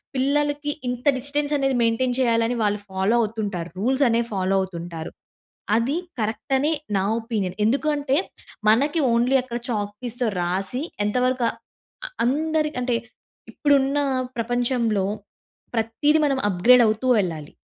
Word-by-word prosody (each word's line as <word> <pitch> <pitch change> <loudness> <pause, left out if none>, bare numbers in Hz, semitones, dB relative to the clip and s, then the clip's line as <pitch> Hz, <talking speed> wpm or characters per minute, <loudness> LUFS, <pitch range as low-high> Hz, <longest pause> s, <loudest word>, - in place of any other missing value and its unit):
పిల్లలకి 290 +2 0 0.2
ఇంత 245 0 -4
డిస్టెన్స్ 290 +3 -1
అనేది 270 -1 +1
మెయింటైన్ 245 +2 +1
చేయాలని 230 -1 +2
వాళ్ళు 205 0 +1
ఫాలో 190 +4 +1
అవుతుంటారు. 205 -6 -3
రూల్స్ 260 +6 +2
అనేవి 235 0 +1
ఫాలో 190 0 0
అవుతుంటారు. 170 -3 -6 0.7
అది 260 +8 0 0.2
కరెక్ట్ 220 +4 -2
అనె, 295 +4 +1 0.3
నా 190 - +1 0.2
ఒపీనియన్. 215 -6 -3
ఎందుకంటే 285 +3 +1 0.5
మనకి 285 +9 +3
ఓన్లీ 240 +3 +2
అక్కడ 240 -2 -5
చాక్ 205 -3 -2
పీస్‌తో 245 0 -2
రాసి, 190 - -2 0.2
ఎంతవరక 250 +3 +1 0.6
అ - - -9 0.2
అందరికి 305 +3 0
అంటే, 245 -1 0 0.6
ఇప్పుడున్న 280 0 +2 0.4
ప్రపంచంలో 235 -3 0 0.7
ప్రతీది 230 +8 +2
మనం 275 -2 0
అప్‌గ్రేడ్ 235 +8 +5
అవుతూ 220 +4 -1 0.2
ఎళ్ళాలి. 155 -4 -6
240 Hz, 120 wpm, -23 LUFS, 210-275 Hz, 0.7 s, అప్‌గ్రేడ్